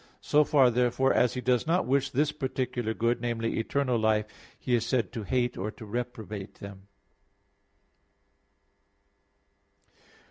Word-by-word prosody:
So 150 +1 +4
far, 135 -4 +4
therefore, 125 +2 +2
as 125 0 +2
He 125 - -3
does 125 +2 +1
not 175 +3 +2
wish 135 +1 +1
this 145 +3 +1
particular 125 -5 -3
good 115 +1 0
namely, 115 -2 -1
eternal 125 +1 0
life 110 -1 +2 0.3
He 125 - -3
is 120 - +3
said 125 -3 0
to 115 - -4
hate 120 +2 -1
or 105 +3 -3
reprobated 110 -3 -6
them. 100 -1 -11
120 Hz, 130 wpm, -28 LUFS, 110-130 Hz, 0.3 s, So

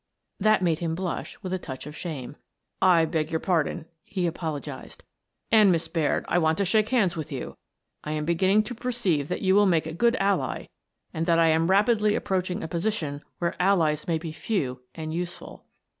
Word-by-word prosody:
" - - -53
That 215 -3 +4
made 165 -3 +1
him 165 -2 -2
blush 180 0 -4
with 185 -1 -3
a 185 - -1
touch 130 -6 -7
of 150 +1 -8
shame. 145 -6 -6 0.3
" - - -51 0.2
I 165 - +4
beg 155 -1 -1
your 160 - -1
pardon," 170 -2 0 0.2
he 185 -3 -2
apologized, 155 -5 -5 0.3
" - - -51
and, 215 -4 +6
Miss 165 -2 0
Baird, 160 -4 0
I 175 - +2
want 160 -1 +2
to 200 - +1
shake 215 +3 +2
hands 210 -9 +2
with 155 -1 -5
you. 135 -3 -5 0.5
I 150 - -3
am 150 -1 -2
be 170 - +2
ginning 190 +5 +3
to 245 - -6
perceive 220 - -1
that - - -3
you 190 0 +4
will 205 +1 +5
make 165 -4 +2
a 160 - -5
good 235 +8 +2
ally 195 0 0 0.5
and 165 0 -2
that 170 -1 +4
I 165 -1 +5
am 160 +2 +2
rapidly 210 +2 +3
approaching 185 0 -1
a - - -3
position 165 -4 -2 0.2
where 170 -1 -1
allies 165 -6 +2
may 165 -2 +1
be 160 0 -6
few 150 - -2
and 155 -1 -5
useful." 175 +1 -6
170 Hz, 210 wpm, -26 LUFS, 155-195 Hz, 0.5 s, and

